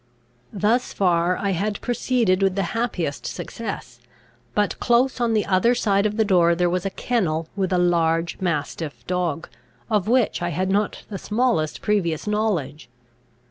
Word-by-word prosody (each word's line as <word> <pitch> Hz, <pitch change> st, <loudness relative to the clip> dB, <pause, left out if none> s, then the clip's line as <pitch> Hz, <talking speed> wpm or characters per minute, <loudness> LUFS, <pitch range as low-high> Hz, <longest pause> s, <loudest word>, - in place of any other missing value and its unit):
Thus 215 Hz, +5 st, +1 dB
far 180 Hz, -1 st, +2 dB
I 200 Hz, -1 st, -1 dB
had 200 Hz, +3 st, -1 dB
proceeded 240 Hz, -6 st, +1 dB
with 195 Hz, -1 st, +2 dB
the 195 Hz, -, 0 dB
happiest 210 Hz, -11 st, -2 dB
success; 230 Hz, -, -6 dB, 0.6 s
but 210 Hz, -1 st, 0 dB
close 245 Hz, +1 st, +2 dB
on 230 Hz, -2 st, +2 dB
the 210 Hz, -, +1 dB
other 195 Hz, +6 st, +3 dB
side 200 Hz, -2 st, +2 dB
of 210 Hz, +1 st, -5 dB
the 220 Hz, -, +3 dB
door 175 Hz, -4 st, +4 dB
there 175 Hz, 0 st, +1 dB
was 180 Hz, +1 st, -1 dB
a -, -, -1 dB
kennel 170 Hz, -9 st, -1 dB
with 190 Hz, -2 st, -1 dB
a 180 Hz, -, +2 dB
large 170 Hz, -1 st, +1 dB
mastiff 160 Hz, -3 st, -3 dB
dog, 175 Hz, -3 st, -2 dB, 0.4 s
of 210 Hz, -3 st, +1 dB
which 245 Hz, -4 st, +2 dB
I 175 Hz, -, -1 dB
had 185 Hz, +3 st, -1 dB
not 205 Hz, +1 st, 0 dB
the 200 Hz, -3 st, -5 dB
smallest 215 Hz, -9 st, 0 dB
previous 175 Hz, -7 st, 0 dB
knowledge. 175 Hz, -, -1 dB
190 Hz, 160 wpm, -23 LUFS, 170-215 Hz, 0.6 s, door